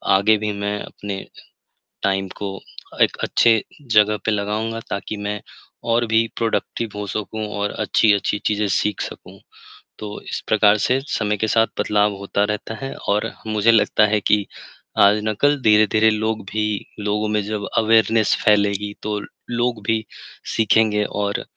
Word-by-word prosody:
आगे 105 Hz, +2 st, +4 dB
भी 105 Hz, 0 st, -2 dB
मैं 100 Hz, +1 st, -2 dB
अपने 100 Hz, -2 st, -7 dB, 0.8 s
टाइम 95 Hz, -1 st, 0 dB
को 100 Hz, -1 st, -5 dB, 0.4 s
एक -, -, +2 dB
अच्छे 115 Hz, -2 st, +3 dB, 0.3 s
जगह 105 Hz, 0 st, +5 dB
पे -, -, +1 dB
लगाऊँगा 105 Hz, +2 st, -2 dB
ताकि 100 Hz, +2 st, -4 dB
मैं 105 Hz, 0 st, -3 dB, 0.5 s
और 120 Hz, 0 st, +2 dB
भी 110 Hz, +1 st, +2 dB
प्रोडक्टिव 115 Hz, 0 st, -2 dB
हो 105 Hz, 0 st, -4 dB
सकूँ 110 Hz, +1 st, -4 dB
और 100 Hz, 0 st, -1 dB
अच्छी-अच्छी 105 Hz, -1 st, +2 dB
चीज़ें 105 Hz, 0 st, +1 dB
सीख 105 Hz, +2 st, 0 dB
सकूँ। -, -, -9 dB, 0.6 s
तो 105 Hz, -1 st, -6 dB
इस -, -, -5 dB
प्रकार 105 Hz, -1 st, +4 dB
से 130 Hz, +1 st, +2 dB
समय 105 Hz, -1 st, -1 dB
के 110 Hz, -, -1 dB
साथ 115 Hz, +1 st, +3 dB
बदलाव 105 Hz, 0 st, +2 dB
होता 100 Hz, +1 st, -1 dB
रहता 105 Hz, +1 st, -4 dB
है 135 Hz, -, -5 dB, 0.2 s
और 105 Hz, +3 st, +1 dB, 0.2 s
मुझे 110 Hz, +1 st, +3 dB
लगता 110 Hz, -1 st, +4 dB
है 105 Hz, +1 st, +1 dB
कि 105 Hz, 0 st, +2 dB, 0.6 s
आज 100 Hz, +1 st, +6 dB
ना 110 Hz, -, 0 dB
कल 145 Hz, 0 st, +4 dB
धीरे-धीरे 110 Hz, 0 st, +4 dB
लोग 110 Hz, +1 st, -1 dB
भी 110 Hz, 0 st, -1 dB, 0.4 s
लोगों 105 Hz, +1 st, -1 dB
में 105 Hz, 0 st, +1 dB
जब 105 Hz, 0 st, -4 dB
अवेयरनेस 110 Hz, -1 st, +3 dB
फैलेगी 105 Hz, -1 st, +2 dB
तो 105 Hz, -1 st, -2 dB, 0.3 s
लोग 120 Hz, -2 st, -1 dB
भी 110 Hz, -1 st, +1 dB, 0.5 s
सीखेंगे 110 Hz, -1 st, +3 dB
और 100 Hz, 0 st, -2 dB
105 Hz, 155 wpm, -21 LUFS, 105-110 Hz, 0.8 s, आज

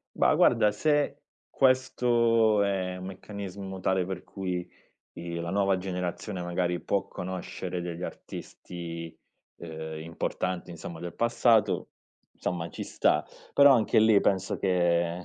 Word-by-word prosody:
Ma -, -, +4 dB
guarda 105 Hz, -, +4 dB
se 145 Hz, +3 st, +1 dB, 0.3 s
questo 120 Hz, -4 st, +3 dB
è 95 Hz, -2 st, -1 dB
un 90 Hz, -, -7 dB
meccanismo 95 Hz, 0 st, -7 dB
tale 95 Hz, 0 st, +1 dB
per 95 Hz, -1 st, -5 dB
cui 90 Hz, -3 st, -4 dB, 0.5 s
i 85 Hz, 0 st, -6 dB
la 85 Hz, 0 st, -3 dB
nuova 100 Hz, -1 st, +2 dB
generazione 90 Hz, +1 st, -4 dB
magari 90 Hz, 0 st, -1 dB
può 100 Hz, -, -1 dB
conoscere 90 Hz, -1 st, -5 dB
degli 85 Hz, 0 st, -5 dB
artisti, 85 Hz, -3 st, -7 dB, 0.4 s
uhm, 80 Hz, -1 st, -6 dB
importanti 85 Hz, +2 st, -3 dB
insomma, 85 Hz, -1 st, -8 dB
del 85 Hz, -1 st, -6 dB
passato 115 Hz, -1 st, +2 dB, 0.5 s
insomma, 85 Hz, -2 st, -3 dB
ci -, -, -6 dB
sta, -, -, +2 dB, 0.3 s
però 140 Hz, -1 st, +8 dB
anche 110 Hz, -3 st, +3 dB
lì 110 Hz, -2 st, +6 dB
penso 95 Hz, -1 st, 0 dB
che 85 Hz, -2 st, +1 dB
95 Hz, 125 wpm, -28 LUFS, 85-100 Hz, 0.5 s, però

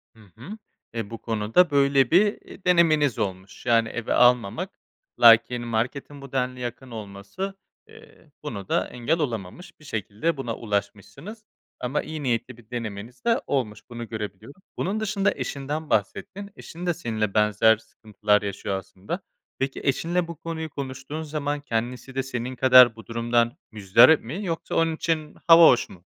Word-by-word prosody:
Hı -, -, -20 dB, 0.2 s
hı. 135 Hz, -, -9 dB, 0.4 s
E, 115 Hz, -3 st, -4 dB
bu 115 Hz, -, -6 dB
konuda 115 Hz, +10 st, +2 dB
böyle 140 Hz, -2 st, +3 dB
bir, 205 Hz, +4 st, +3 dB
iii, -, -, -15 dB
denemeniz 155 Hz, -, +3 dB
olmuş. 95 Hz, +2 st, -5 dB
Yani, 115 Hz, -2 st, +3 dB
eve 120 Hz, -1 st, -3 dB
almamak. 125 Hz, -4 st, +3 dB, 0.5 s
Lakin 120 Hz, +1 st, +6 dB
marketin 130 Hz, +5 st, -3 dB
bu 140 Hz, -1 st, -11 dB
denli 125 Hz, -1 st, -2 dB
yakın 125 Hz, +1 st, -6 dB
olması, 105 Hz, -, -6 dB, 0.3 s
eee, 155 Hz, -, -18 dB
buna 100 Hz, -10 st, -6 dB
da -, -, 0 dB
engel 125 Hz, +7 st, -1 dB
olamamış. 120 Hz, -, -5 dB
Bir 155 Hz, -, -17 dB
şekilde 110 Hz, -, -2 dB
buna 120 Hz, -4 st, -4 dB
ulaşmışsınız 115 Hz, -, -5 dB, 0.4 s
ama 125 Hz, +4 st, -1 dB
iyi 155 Hz, -1 st, -6 dB
niyetli 125 Hz, -1 st, -2 dB
bir 115 Hz, -2 st, -19 dB
denemeniz 115 Hz, 0 st, -6 dB
de 235 Hz, +2 st, +2 dB
olmuş. 115 Hz, -7 st, -1 dB
Bunu 120 Hz, -1 st, -7 dB
görebiliyorum. 110 Hz, -, -7 dB, 0.2 s
Bunun 205 Hz, +4 st, -1 dB
dışında 205 Hz, -2 st, +1 dB
eşinden 145 Hz, +3 st, -4 dB
bahsettin. 195 Hz, -, -2 dB
Eşin 170 Hz, +2 st, -9 dB
de 175 Hz, -, +1 dB
seninle 110 Hz, -, -3 dB
benzer 105 Hz, +1 st, +4 dB
sıkıntılar 105 Hz, -1 st, -1 dB
yaşıyor 100 Hz, -1 st, -3 dB
aslında. 95 Hz, -, -6 dB, 0.4 s
Peki, 135 Hz, 0 st, -2 dB
eşinle 170 Hz, +5 st, 0 dB
bu 170 Hz, -, -7 dB
konuyu 160 Hz, 0 st, -5 dB
konuştuğun 135 Hz, +2 st, -6 dB
zaman 145 Hz, -2 st, -3 dB
kendisi 125 Hz, +1 st, -4 dB
de 135 Hz, -, 0 dB
senin 125 Hz, -1 st, -5 dB
kadar 125 Hz, -2 st, +7 dB
bu 115 Hz, -, -13 dB
durumdan 115 Hz, 0 st, 0 dB
muzdarip 110 Hz, +8 st, +5 dB
mi 165 Hz, -, -5 dB
yoksa 165 Hz, -3 st, -3 dB
onun 165 Hz, -1 st, +2 dB
için 155 Hz, -2 st, -2 dB
hava 165 Hz, -1 st, +9 dB
hoş 120 Hz, -, +3 dB
mu? 90 Hz, -2 st, -15 dB
125 Hz, 155 wpm, -25 LUFS, 110-155 Hz, 0.5 s, hava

